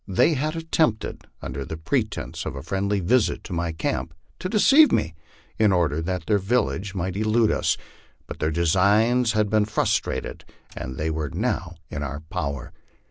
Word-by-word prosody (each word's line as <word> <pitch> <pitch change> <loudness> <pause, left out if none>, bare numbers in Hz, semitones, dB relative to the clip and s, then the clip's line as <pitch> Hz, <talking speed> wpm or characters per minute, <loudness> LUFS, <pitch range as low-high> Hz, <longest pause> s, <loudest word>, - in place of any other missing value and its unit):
They 100 - +3
had 155 +3 -1
attempted, 160 -9 0 0.2
under 65 +2 -4
pretence 80 +3 -3
of - - -4
a 70 - -6
friendly 100 +1 -1
visit 115 +6 +2
to 100 - -7
my 85 0 -1
camp, 80 0 -3 0.2
to 185 - -3
deceive 275 +8 +6
me, 80 +1 +1 0.5
in 105 -2 +5
order 80 -4 +1
that 90 0 -3
their 105 -2 +2
village 100 -1 -1
might 95 0 -2
elude 110 +2 +2
us, - - +1 0.5
but - - -8
their 75 - +1
designs 100 +9 +3
had 110 -1 +2
been 105 0 +2
frustrated, 105 - -1 0.3
and 65 0 -6
they 80 +1 -1
were 80 -2 -2
now 85 +6 -2 0.2
in 70 - -4
em 70 +1 -5
power. 70 -8 -4
95 Hz, 165 wpm, -24 LUFS, 80-110 Hz, 0.5 s, deceive